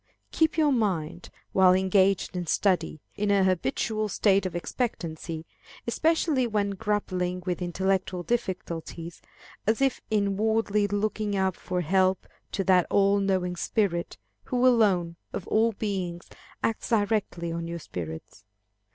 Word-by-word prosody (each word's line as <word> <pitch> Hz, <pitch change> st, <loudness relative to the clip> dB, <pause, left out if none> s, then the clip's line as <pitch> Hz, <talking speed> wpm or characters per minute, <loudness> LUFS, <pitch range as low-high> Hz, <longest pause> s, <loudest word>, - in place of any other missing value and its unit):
Keep 320 Hz, 0 st, +2 dB
your 305 Hz, -2 st, +4 dB
mind, 175 Hz, -, -1 dB, 0.2 s
while 185 Hz, -1 st, +6 dB
engaged 190 Hz, 0 st, +2 dB
in 175 Hz, -2 st, -3 dB
study, 185 Hz, -3 st, +1 dB, 0.2 s
in 205 Hz, 0 st, -1 dB
a 200 Hz, -1 st, +4 dB
habitual 190 Hz, -, 0 dB
state 195 Hz, -1 st, +2 dB
of 180 Hz, -, -8 dB
expectancy, 165 Hz, -5 st, -3 dB, 0.4 s
especially 300 Hz, 0 st, +1 dB
when 205 Hz, -2 st, 0 dB
grappling 185 Hz, -3 st, -2 dB
with 180 Hz, -1 st, -2 dB
intellectual 185 Hz, 0 st, -1 dB
difficulties, 170 Hz, -6 st, -4 dB, 0.5 s
as 220 Hz, +1 st, +2 dB
if 270 Hz, -1 st, +1 dB
inwardly 210 Hz, 0 st, +1 dB
looking 205 Hz, 0 st, -1 dB
up 190 Hz, -2 st, +1 dB
for 180 Hz, -1 st, -3 dB
help 185 Hz, +3 st, +2 dB, 0.3 s
to 195 Hz, -, -1 dB
that 185 Hz, -2 st, +4 dB
all 200 Hz, 0 st, +3 dB
knowing 185 Hz, -2 st, 0 dB
Spirit, 175 Hz, -2 st, -1 dB, 0.3 s
who 250 Hz, 0 st, +1 dB
alone, 195 Hz, -9 st, +3 dB, 0.2 s
of 180 Hz, -, -4 dB
all 225 Hz, +1 st, +3 dB
beings, 185 Hz, -5 st, -3 dB, 0.4 s
acts 225 Hz, -, -1 dB
directly 205 Hz, -6 st, 0 dB
on 165 Hz, 0 st, -4 dB
our 170 Hz, -, -4 dB
spirits. 80 Hz, -, -7 dB
195 Hz, 130 wpm, -27 LUFS, 180-215 Hz, 0.5 s, while